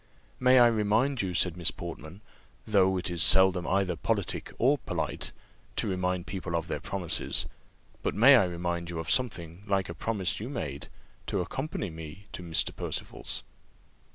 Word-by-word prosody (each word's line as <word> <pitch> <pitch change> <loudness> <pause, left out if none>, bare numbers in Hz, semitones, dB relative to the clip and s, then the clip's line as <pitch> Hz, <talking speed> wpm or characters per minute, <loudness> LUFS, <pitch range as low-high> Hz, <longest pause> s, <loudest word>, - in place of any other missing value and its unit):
"May 130 0 +5
I 120 - +8
remind 115 +4 +2
you," 90 -3 -3
said 85 -1 +2
Miss 85 -2 +2
Portman, 80 - -8 0.4
"though 95 -3 +3
it 90 0 -1
is 85 -2 -1
seldom 95 -1 +6
either 95 -2 +1
politic - - -1
or 135 +4 +3
polite, - - -3 0.4
to - - 0
remind 90 -1 -1
people 95 -3 -4
of 85 0 -2
their 75 - -3
promises, 85 +2 -1 0.6
but - - -2
may 130 +6 +8
I 115 -7 +5
remind 85 -1 -3
you 85 - -5
of 80 - -1
something 90 -9 0
like 95 -2 0
a - - -4
promise 95 0 -1
you 110 +5 -5
made, 75 - -5 0.4
to 100 - -1
accompany 130 - -4
me 80 +4 -9
to - - -7
Mr. 85 -2 0
Percival's?" - - -4
95 Hz, 165 wpm, -29 LUFS, 85-105 Hz, 0.6 s, I